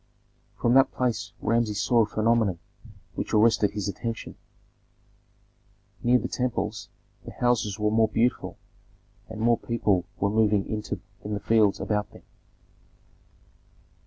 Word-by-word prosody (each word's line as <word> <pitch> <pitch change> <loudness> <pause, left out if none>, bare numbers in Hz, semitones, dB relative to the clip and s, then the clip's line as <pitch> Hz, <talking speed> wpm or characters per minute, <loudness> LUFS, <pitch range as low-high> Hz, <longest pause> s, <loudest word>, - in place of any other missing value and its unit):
From 120 - +2
that 135 +1 +5
place 125 -3 -2
Rameses 115 -3 0
saw 120 +2 +3
a - - +3
phenomenon 110 -3 +1 0.6
which - - -3
arrested 110 -1 +4
his 105 -2 -4
attention. 115 +3 -5 1.7
Near 125 +1 +4
the - - -3
temples 110 -4 -3 0.3
the - - -9
houses 120 -5 0
were 105 0 0
more 110 0 +4
beautiful, 115 +3 -1 0.7
and 110 -1 -8
more 120 0 +3
people 105 -6 0
were 100 +1 +1
moving 105 -2 +2
in 105 -1 -4 0.5
the - - -3
fields 110 -1 +3
about 105 -1 -1
them. - - -15
110 Hz, 125 wpm, -26 LUFS, 105-115 Hz, 1.7 s, that